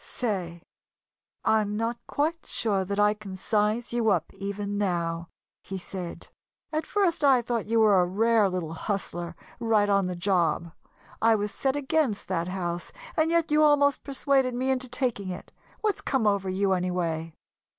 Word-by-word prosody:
"Say, 180 -8 -3 0.8
I'm 210 -1 +2
not 230 +2 -1
quite 320 +3 -1
sure 200 -4 0
that 200 +2 -3
I 210 0 +5
can 210 -3 -9
size 210 +4 0
you 235 -2 +2
up, 175 -5 0
even 200 +1 -4
now," 170 -3 -1 0.3
he 195 - -6
said. 180 -1 -6 0.5
"At 310 +1 -1
first 360 -7 +1
I 265 -4 +5
thought 235 -2 -1
that - - -17
you 225 0 +3
were 205 -4 +6
a - - +3
rare 215 +2 +3
little 175 -3 -3
hustler, 175 -2 -3 0.2
right 220 -3 +3
on 200 -2 +3
the 180 - -3
job. 175 -2 +1 0.5
I 225 0 +5
was 205 -1 -1
set 265 +4 0
against 285 -5 0
that 170 +1 -1
house 175 -2 -3 0.2
and 315 0 +2
yet 335 -2 +1
you 300 0 +4
almost 285 -2 +4
persuaded 270 -2 +1
me 260 +2 +1
into 255 -1 -1
taking 240 -6 -1
it. 180 - -7 0.3
What's 425 -3 0
come 265 -5 0
over 200 -2 +2
you, 190 +1 +1
anyway?" 170 -3 -2
210 Hz, 170 wpm, -27 LUFS, 185-250 Hz, 0.8 s, were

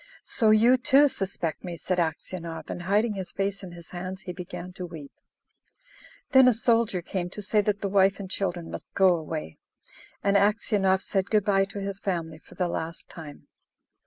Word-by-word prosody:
"So 225 -4 +2
you, 230 +4 +6
too, 280 +3 +5
suspect 185 - -4
me!" 175 -2 -5
said 185 +2 -1
Aksionov, 165 0 -4
and, - - -5
hiding 210 +5 +1
his 190 -3 -5
face 195 +1 -2
in 185 -3 -8
his 170 -1 -12
hands, 185 +2 -6
he 180 - -6
began 180 0 -8
to 180 0 -6
weep. 155 -5 -10 1.2
Then 265 -1 +7
a 250 - +5
soldier 225 -5 +1
came 175 0 -3
to 210 - -8
say 210 +1 +2
that 205 0 -1
the 200 - 0
wife 195 0 +3
and 195 - -5
children 180 -3 -3
must - - -8
go 190 -2 +5
away; 155 - -5 0.6
and 200 0 +2
Aksionov 200 -2 +2
said 195 -1 -1
good 210 -2 +2
bye 195 -1 +3
to 200 +1 -8
his 200 0 -4
family 165 -5 -3
for - - -18
the 180 - 0
last 165 -1 -5
time. 155 -4 -11
190 Hz, 190 wpm, -26 LUFS, 175-205 Hz, 1.2 s, Then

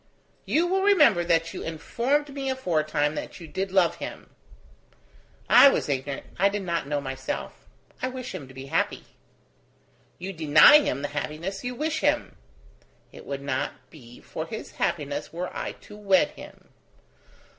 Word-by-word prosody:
"You 330 +3 +2
will 380 +2 +1
remember 300 - +5
that 165 -1 +1
you - - -6
informed 260 - -1
me 270 -1 -3
aforetime 155 - 0
that 155 - -6
you 170 - -9
did 190 +3 -3
love 175 -3 +3
him." - - -8 1.2
"I 280 - +9
was - - -1
ignorant... 140 0 -3
I 200 +2 +5
did 205 0 -3
not 170 -5 -2
know 145 0 -1
myself. 135 -1 -6 0.3
I 255 - 0
wish 255 -1 -6
him 155 -8 -7
to 130 - -14
be 135 0 -8
happy." - - -1 1.1
"You 190 +2 -6
deny 155 - +7
him 140 - -2
the 145 - -2
happiness 155 +6 -4
you 250 0 -4
wish 315 +4 -1
him!" - - 0 0.8
"It - - -13
would 140 0 -5
not 135 -2 -4
be 120 -7 -14
for - - -6
his - - -7
happiness 145 0 -2
were 175 +3 -5
I - - -4
to 210 - -12
wed 195 -3 +3
him." - - -14
170 Hz, 160 wpm, -26 LUFS, 145-245 Hz, 1.2 s, I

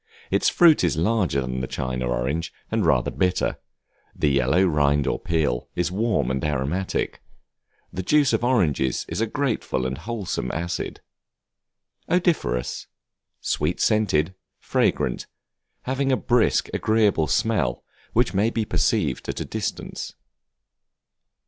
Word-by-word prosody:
Its - - +3
fruit 165 - +5
is 85 -3 +1
larger 90 -5 +1
than 65 0 -3
the 65 - -3
China 65 -1 -3
orange, 65 +7 -1 0.2
and - - +1
rather - - +2
bitter; 90 0 0 0.6
the 75 - +1
yellow 70 +7 +3
rind 75 -4 +2
or - - -1
peel 75 -8 -1
is 90 0 0
warm 105 - 0
and 65 0 -2
aromatic. 75 +6 -1 0.7
The 95 - -3
juice 140 +6 +3
of 115 - +1
oranges 85 - +1
is - - -3
a 115 - +1
grateful 115 - -1
and 65 +1 -3
wholesome 110 -5 -3
acid. 85 +2 -4 1.1
Odoriferous, 170 - 0 0.5
sweet - - -1
scented, 95 -6 +2 0.2
fragrant; - - 0 0.6
having 135 +1 0
a 130 - +3
brisk, 120 -2 +2
agreeable 105 -8 +2
smell 75 - 0 0.3
which 120 -1 +2
may 100 +4 +2
be 115 -2 -1
perceived - - 0
at - - -3
a - - -3
distance. - - -5
90 Hz, 130 wpm, -24 LUFS, 70-115 Hz, 1.1 s, fruit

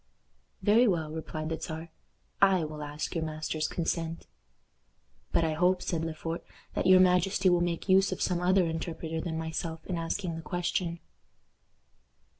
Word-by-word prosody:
"Very 225 +4 +5
well," 160 -6 0
replied 155 0 -4
the 160 -1 -3
Czar; 160 +1 -5 0.5
"I 190 -3 +5
will 155 -1 -5
ask 150 +1 -4
your 165 - -1
master's 155 0 -2
consent." 165 -1 -2 1.1
"But 165 - +3
I 160 -1 +1
hope," 180 +3 +2
said 165 -2 -1
Le 165 -1 -3
Fort, 165 +1 -4 0.3
"that - - 0
your 185 0 +8
majesty 185 +1 +4
will 175 -1 +3
make 175 +1 -1
use 190 0 +5
of - - -3
some 175 -2 0
other 185 +1 +4
interpreter 160 0 -3
than 160 -2 -3
myself 160 0 -4
in 180 - -3
asking 165 +1 -2
the 165 - -5
question." 170 +1 -2
165 Hz, 160 wpm, -29 LUFS, 160-180 Hz, 1.1 s, your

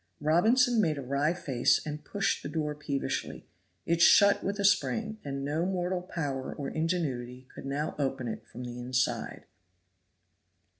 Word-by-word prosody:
Robinson 225 - +4
made 155 -6 +1
a 140 - -5
wry 140 +4 +1
face 140 -9 +2
and 150 0 -5
pushed 200 -1 -1
the - - -6
door 150 -2 -2
peevishly; 145 -2 -3 0.4
it 170 0 +1
shut 200 +3 +6
with 200 +1 -2
a 200 - +1
spring, 215 +2 +1
and 140 -1 -4
no 150 +4 0
mortal 180 -1 -1
power 145 -7 -4
or 140 - -4
ingenuity 130 -7 -2
could - - -8
now 145 +3 -2
open 135 -3 -1
it 110 - -5
from 125 - -9
the 120 0 -6
inside. 125 +1 -1
150 Hz, 155 wpm, -29 LUFS, 135-180 Hz, 0.4 s, shut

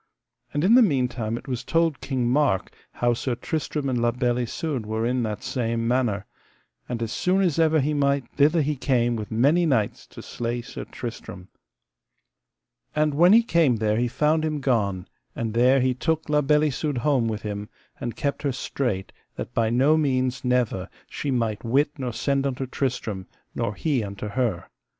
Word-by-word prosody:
And 145 - -1
in 200 +5 +5
the 255 - +8
meantime 125 - +1
it - - -11
was 125 -2 -3
told 165 0 +1
King 130 -3 -1
Mark 125 -7 +1 0.2
how 120 0 +1
Sir 120 +1 -2
Tristram 150 +2 -3
and 125 -3 0
La 120 - +3
Beale 120 +1 0
Isoud 130 +2 -3
were 110 +1 -1
in 125 +1 +1
that 105 -3 -3
same 115 -2 -1
manor, 120 -5 0 0.6
and 120 -1 -2
as 115 - -3
soon 185 +7 +1
as 170 -4 +1
ever 160 -1 +4
he 150 +2 0
might 140 -2 +1
thither 150 +3 +3
he 150 +1 -1
came 120 -3 +1
with 105 -2 -5
many 145 +10 +3
knights 115 -8 0
to - - -11
slay 120 0 -3
Sir 130 - -7
Tristram. 110 -6 -8 1.5
And 150 -1 +2
when 175 +5 +5
he 230 +2 +7
came 165 - +3
there 110 -1 0
he 120 +1 +1
found 155 +5 +1
him 155 -1 -1
gone; 105 -9 0 0.3
and 115 -2 -3
there 125 +3 +4
he 130 0 +2
took 160 +5 -1
La 150 0 +3
Beale 150 +1 +3
Isoud 150 -1 -1
home 125 -2 +2
with 110 -1 -3
him, 105 -1 -5 0.3
and 120 - -4
kept 140 -1 -2
her 140 - 0
strait 120 -6 -3 0.2
that 120 - -6
by 115 -1 +1
no 135 +7 +4
means 130 -3 0
never 125 -7 0 0.2
she 145 - -3
might 115 -5 -1
wit 140 +5 +2
nor 125 -2 -2
send 140 +3 0
unto 130 0 -3
Tristram, 120 -7 -3 0.3
nor 105 - -2
he 135 +1 0
unto 100 +1 -6
her. 115 -6 -1
125 Hz, 185 wpm, -24 LUFS, 115-145 Hz, 1.5 s, the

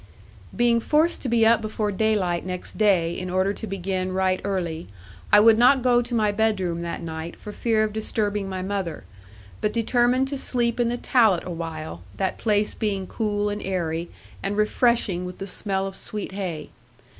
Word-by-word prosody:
Being 235 -1 +3
forced 310 +8 +2
to 260 - -2
be 230 -1 +4
up 230 0 +5
before 215 -1 -2
daylight 195 -4 +1
next 180 -1 -5
day, 180 -6 +3
in 185 0 -5
order 185 +2 +1
to 220 - -7
begin 185 -1 -2
right 185 0 +1
early, 175 -5 -3 0.4
I 210 - +8
would 220 +1 +6
not 250 +1 +5
go 245 -1 +4
to 245 0 -4
my 215 -2 +2
bedroom 200 -5 0
that 170 0 -4
night 160 0 -6
for 210 - -9
fear 220 0 +1
of 215 -1 -2
disturbing 210 -2 -1
my 185 -1 -4
mother, 190 -5 -3 0.6
but 210 - +1
determined 245 +3 +2
to 280 -1 -3
sleep 240 -2 0
in 240 - +3
the 245 - -1
tallat 220 -9 +3
awhile, 160 - -6 0.2
that 190 - -1
place 210 -1 +1
being 200 -4 -2
cool, 210 0 -1
and 205 0 -4
airy, 170 -3 -2 0.3
and 200 +1 -2
refreshing 215 -4 +2
with 180 0 -7
the 195 - -5
smell 195 0 0
of 195 -1 -6
sweet 210 0 -4
hay. 180 -6 -5
205 Hz, 180 wpm, -24 LUFS, 185-225 Hz, 0.6 s, I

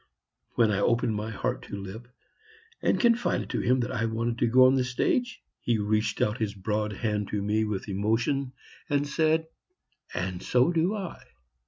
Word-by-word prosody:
When 115 -2 +4
I 100 - +1
opened 115 +1 +2
my 105 +1 -3
heart 110 - -2
to - - -6
Lipp 100 +5 -8 0.7
and - - +2
confided 235 0 +2
to - - -1
him 125 +1 +2
that 120 - -2
I 115 -3 -1
wanted 115 +1 -2
to 120 - +3
go 130 +2 +6
on 130 - +6
the 130 -1 +2
stage, 235 - -1 0.2
he 120 -2 0
reached 105 0 0
out 105 +3 -1
his 105 -2 -2
broad 105 +2 -1
hand 105 -1 -2
to 105 - -2
me 110 +2 +1
with 105 -2 -3
emotion 115 +7 0 0.4
and 145 0 +1
said, 160 +2 +2 0.7
"And 90 -1 -3
so 125 +6 +3
do 175 +5 +1
I." 195 -4 -6
115 Hz, 180 wpm, -27 LUFS, 105-130 Hz, 0.7 s, go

